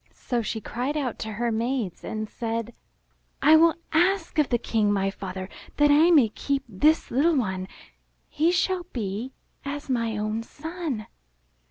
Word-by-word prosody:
So 245 -2 -3
she 220 0 -3
cried 250 +7 -3
out 260 -6 -2
to 220 0 -4
her 235 +2 -1
maids 230 -3 -2
and 215 0 -4
said, 230 +1 -4 0.7
'1 315 +1 +7
will 335 -1 +5 0.2
ask 345 0 +2
of 295 - +3
the 240 - +2
King, 220 -3 +1
my 195 -1 +1
father, 190 -1 -6 0.3
that 295 0 +5
I 310 +4 +6
may 285 -10 +6
keep 275 +5 -2
this 295 - +2
little 305 +7 +3
^ - - +2
one. 190 -6 -1 0.6
He 320 +3 +2
shall 360 0 0
be 220 +2 -3 0.3
as 285 0 -5
my 230 -3 0
own 215 +1 -2
son." 305 -3 -5
245 Hz, 165 wpm, -26 LUFS, 215-305 Hz, 0.7 s, 1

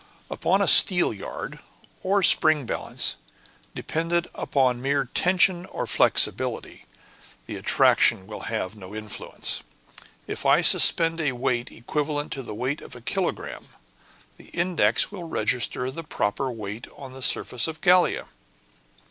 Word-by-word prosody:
"Upon - - +1
a - - -1
steelyard, 175 - +3 0.4
or 195 +1 +1
spring 155 -5 +4
balance, - - 0 0.6
dependent 170 +2 -2
upon 125 -3 0
mere 140 +1 0
tension 180 +5 +1
or - - -5
flexibility, - - +1 0.6
the - - -7
attraction 95 - +2
will 105 +1 -9
have 110 -3 -4
no 100 0 -11
influence. 110 -1 -3 0.6
If - - -6
I - - +4
suspend 165 0 +5
a 145 -4 0
weight 120 -1 -2
equivalent 145 +4 -4
to 135 - -4
the 115 -4 -8
weight 130 +7 -3
of - - -11
a 120 - -12
kilogramme, 185 +9 -4 0.7
the - - -16
index 170 - +1
will 185 -4 -8
register 125 +1 -1
the 165 +5 -8
proper 130 -2 -2
weight 110 0 -7
on 135 -2 -10
the 130 - -11
surface 125 0 +1
of 160 0 -7
Gallia. 180 -1 +3
135 Hz, 130 wpm, -24 LUFS, 115-165 Hz, 0.7 s, suspend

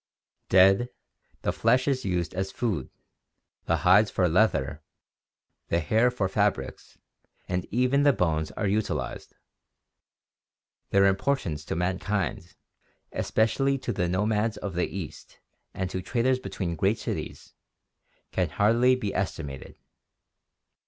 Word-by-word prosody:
Dead, 95 +6 +5 0.5
the - - +1
flesh 125 +4 +2
is 130 -2 0
used 90 -4 -1
as 95 +1 -3
food, 100 - -2 0.8
the - - +1
hides 100 +4 +6
for 90 - +1
leather, 80 -5 +1 0.9
the 85 - +1
hair 110 +10 +3
for 120 -6 -1
fabrics, 100 -8 -2 0.5
and 90 0 -2
even 125 +4 +2
the 145 0 +6
bones 80 - 0
are - - -3
utilized. 105 +2 -2 1.5
Their 100 0 +4
importance 95 - 0
to - - -3
mankind, 95 +1 -2 0.6
especially 135 +5 +1
to - - -3
the 90 - 0
nomads 105 +3 0
of 100 - -5
the 90 +1 0
East 95 -5 -8 0.3
and 95 - -3
to 95 - -3
traders 125 +5 +1
between 90 -8 -4
great 100 +7 +1
cities, - - -6 0.8
can - - 0
hardly 120 +5 +3
be 105 -6 -3
estimated. 75 -8 -4
100 Hz, 120 wpm, -27 LUFS, 90-115 Hz, 1.5 s, hides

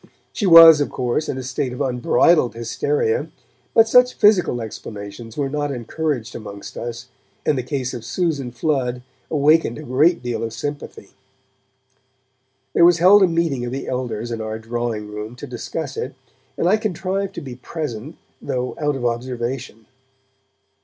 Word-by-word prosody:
She 205 - -1
was, 165 -3 +10
of 145 - 0
course, 125 +5 -2
in 130 - -2
a 130 - -5
state 130 0 -3
of 125 - -7
unbridled 125 +2 +2
hysteria, 445 - -1 0.5
but 225 0 +6
such 250 +2 +5
physical 195 - +3
explanations 110 0 -8
were 140 -2 0
not 145 +1 -2
encouraged 130 0 -3
amongst 100 -2 -9
us, 120 0 -6 0.4
and 150 - +2
the 130 - -1
case 130 -1 -3
of 120 -3 -6
Susan 155 -8 -2
Flood 125 -1 -1 0.3
awakened 150 -4 +3
a - - -8
great 145 +6 +2
deal 120 -1 -3
of 115 -1 -4
sympathy. 145 +5 -6 1.6
There - - +4
was 175 0 +6
held 190 +4 +7
a 190 - +6
meeting 165 -7 0
of 120 - -4
the 135 +1 -5
elders 120 -2 -3
in 115 -1 -3
our 110 0 -4
drawing 115 -1 -4
room 105 +2 -7
to - - -8
discuss - - -5
it, - - -5 0.4
and - - +1
I 205 +4 +4
contrived 195 -2 -3
to - - -5
be 130 -5 -8
present, 145 -1 -6 0.3
though 125 0 -3
out 150 -1 +1
of 125 -2 -4
observation. 120 -1 -3
130 Hz, 160 wpm, -21 LUFS, 120-165 Hz, 1.6 s, was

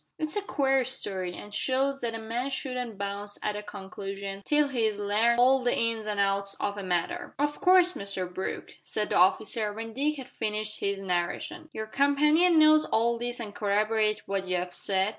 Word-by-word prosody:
"It's 310 +3 -2
a 415 - 0
queer 270 -8 +1
story, 190 -8 -3
an' 205 - -10
shows 275 +4 0
that 230 -1 -2
a - - -5
man 235 +4 -3
shouldn't 250 -5 -4
bounce 200 +1 -4
at 210 - -1
a 210 - -4
conclusion 195 0 -7
till 295 -1 +3
he's 225 -5 0
larned 215 +4 +2
all 260 +2 +5
the 245 -1 +1
ins 230 -2 0
an' 210 -1 -2
outs 200 0 +1
of 205 - -2
a 205 - -5
matter." 190 - -2
"Of 295 +1 -1
course, 365 -2 +5
Mr 200 - -2
Brooke," 180 +2 -5
said 210 -1 -2
the - - +1
officer, 210 +4 +2
when 225 +2 -7
Dick 295 +4 0
had 265 -3 -8
finished 215 -2 -3
his 200 0 -1
narration, 195 - -3
"your 220 - -5
companion 300 +8 +3
knows 310 0 +6
all 235 +1 +1
this 245 +1 -3
and 215 -3 -6
can - - -13
corroborate 215 +1 +1
what 195 -1 -2
you 185 - 0
have 180 0 -4
said?" 190 0 +1
220 Hz, 200 wpm, -28 LUFS, 200-270 Hz, -, knows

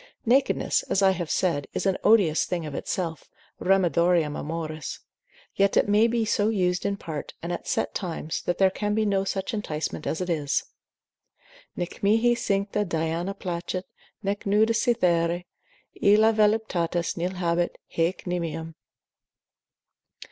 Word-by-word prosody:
Nakedness, 260 +4 +2
as 195 - +2
I 190 - +6
have 175 -3 -3
said, 165 -7 0
is - - -2
an 190 -1 +2
odious 200 -8 +4
thing 175 -3 -3
of 150 - -6
itself, 165 0 -4 0.3
remedium 175 -4 +2
amoris; 155 -1 -4 0.6
yet 200 0 +2
it - - +4
may 210 +2 +4
be 235 -1 0
so 210 -1 +1
used, 180 -3 0
in 200 0 -1
part, 155 -6 -6
and 175 +1 -2
at - - -6
set - - -1
times, 165 -4 -3
that 175 - -2
there 190 -1 +4
can 210 +1 -1
be 220 0 +1
no 195 -1 +1
such 195 +3 -3
enticement 155 -7 -3
as 160 - -1
it 180 - -2
is; 155 -3 0 1.1
Nec 175 0 -5
mihi 225 +4 +4
cincta 200 -2 0
Diana 170 +2 -2
placet, 180 0 -4 0.4
nec 200 +1 -2
nuda 215 +3 +3
Cythere, 180 -8 +2 0.6
Illa 215 +2 +5
voluptatis 210 -6 +1
nil 180 +2 -2
habet, 175 -1 0 0.2
haec 165 +2 0
nimium. 165 -2 -3
185 Hz, 145 wpm, -26 LUFS, 170-205 Hz, 1.1 s, I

